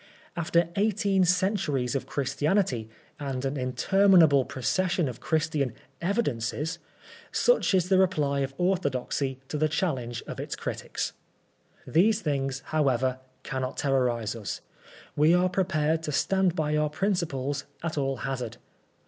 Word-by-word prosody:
After 170 Hz, 0 st, +1 dB
eighteen 200 Hz, -2 st, +2 dB
centuries 180 Hz, -, +1 dB
of 135 Hz, -, -2 dB
Ghristianity, 140 Hz, -, 0 dB, 0.3 s
and 135 Hz, -2 st, -3 dB
an 135 Hz, +2 st, -1 dB
inter 145 Hz, +10 st, +1 dB
minable 160 Hz, -8 st, +6 dB
prooession 175 Hz, +5 st, 0 dB
of 125 Hz, -, -6 dB
Christian 155 Hz, -6 st, 0 dB
* 135 Hz, -, -36 dB
evidenoes/ 160 Hz, -, -1 dB, 0.5 s
such -, -, +3 dB
is 180 Hz, -1 st, +2 dB
the 190 Hz, 0 st, +4 dB
reply 150 Hz, -7 st, +2 dB
of 135 Hz, 0 st, -2 dB
orthodoxy 140 Hz, -7 st, -1 dB
to 150 Hz, -, -3 dB
the 155 Hz, 0 st, +2 dB
challenge 130 Hz, -8 st, -2 dB
of -, -, -7 dB
its -, -, -4 dB
critics -, -, -4 dB, 0.4 s
" -, -, -34 dB
These 215 Hz, +4 st, +4 dB
thingS; 135 Hz, -2 st, -1 dB
however, 130 Hz, -4 st, +1 dB, 0.2 s
cannot 130 Hz, -1 st, -3 dB
terrorise 125 Hz, -5 st, 0 dB
us. 105 Hz, -5 st, -5 dB, 0.5 s
We 155 Hz, +4 st, +5 dB
are 180 Hz, +1 st, +3 dB
prepared 165 Hz, -4 st, +1 dB
to 155 Hz, -, -3 dB
stand 190 Hz, +5 st, +2 dB
by 150 Hz, -2 st, 0 dB
our 150 Hz, 0 st, +2 dB
principles 150 Hz, -6 st, -1 dB, 0.2 s
at 165 Hz, -1 st, -2 dB
all 135 Hz, -2 st, -1 dB
hazard. 125 Hz, -4 st, -3 dB
150 Hz, 140 wpm, -27 LUFS, 135-180 Hz, 0.5 s, minable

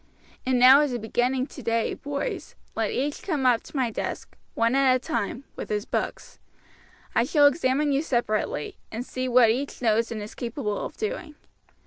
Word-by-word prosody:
And 260 Hz, -1 st, +3 dB
now 255 Hz, +3 st, +8 dB
as 290 Hz, -4 st, 0 dB
a -, -, -1 dB
beginning 245 Hz, +3 st, 0 dB
today, 230 Hz, -5 st, -2 dB
boys, 280 Hz, 0 st, -4 dB, 0.2 s
let -, -, 0 dB
each 285 Hz, +3 st, -2 dB
come 300 Hz, -8 st, -1 dB
up 245 Hz, -3 st, +4 dB
to -, -, -15 dB
my 250 Hz, -3 st, +1 dB
desk, -, -, -5 dB, 0.2 s
one 230 Hz, +1 st, +2 dB
at 270 Hz, -1 st, +4 dB
a -, -, +3 dB
time, 240 Hz, +1 st, -3 dB
with -, -, -6 dB
his 210 Hz, -1 st, -1 dB
books. -, -, -4 dB, 0.7 s
I 235 Hz, -, +3 dB
shall 290 Hz, +3 st, +4 dB
examine 285 Hz, 0 st, +3 dB
you 275 Hz, +1 st, +2 dB
separately, 235 Hz, -, -1 dB
and 230 Hz, +3 st, -4 dB
see 255 Hz, -1 st, -3 dB
what 245 Hz, -2 st, +6 dB
each 275 Hz, +5 st, -3 dB
knows 230 Hz, -1 st, +1 dB
and 225 Hz, -, -3 dB
is 210 Hz, +1 st, -7 dB
capable 230 Hz, -3 st, -3 dB
of -, -, -7 dB
doing. 420 Hz, -8 st, -4 dB
255 Hz, 180 wpm, -26 LUFS, 230-275 Hz, 0.7 s, now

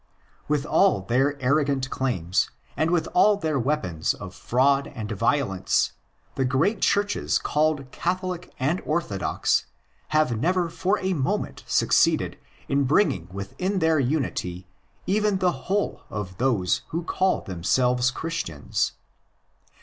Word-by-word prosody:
With 150 Hz, -1 st, 0 dB
all 190 Hz, -, +3 dB
their 135 Hz, +8 st, +1 dB
arrogant 140 Hz, 0 st, +1 dB
claims, 95 Hz, -10 st, 0 dB, 0.3 s
and 155 Hz, -, +1 dB
with 175 Hz, -2 st, +1 dB
all 205 Hz, +3 st, +5 dB
their 155 Hz, -7 st, -1 dB
weapons 105 Hz, -, 0 dB
of -, -, -9 dB
fraud 135 Hz, +3 st, +2 dB
and 110 Hz, -3 st, -5 dB
violence, 110 Hz, -2 st, +1 dB, 0.4 s
the 135 Hz, -, 0 dB
great 155 Hz, -, +1 dB
Churches 205 Hz, 0 st, +1 dB
called 150 Hz, -3 st, 0 dB
Catholic 180 Hz, 0 st, -3 dB
and 145 Hz, +7 st, 0 dB
Orthodox 155 Hz, -, 0 dB, 0.4 s
have 155 Hz, -6 st, +2 dB
never 175 Hz, +4 st, +1 dB
for 195 Hz, +5 st, 0 dB
a 190 Hz, 0 st, 0 dB
moment 135 Hz, -6 st, -2 dB
succeeded -, -, +2 dB, 0.3 s
in 140 Hz, 0 st, +2 dB
bringing 125 Hz, -, +2 dB
within 100 Hz, -, -3 dB
their 160 Hz, -3 st, +3 dB
unity 120 Hz, -, -2 dB, 0.4 s
even 210 Hz, 0 st, +2 dB
the 180 Hz, -8 st, 0 dB
whole 205 Hz, +1 st, 0 dB
of 95 Hz, -3 st, -5 dB
those 115 Hz, -8 st, +1 dB
who 170 Hz, +2 st, -3 dB
call 185 Hz, +2 st, +1 dB
themselves 125 Hz, +8 st, +1 dB
Christians. 135 Hz, -, -2 dB
140 Hz, 125 wpm, -25 LUFS, 120-175 Hz, 0.4 s, all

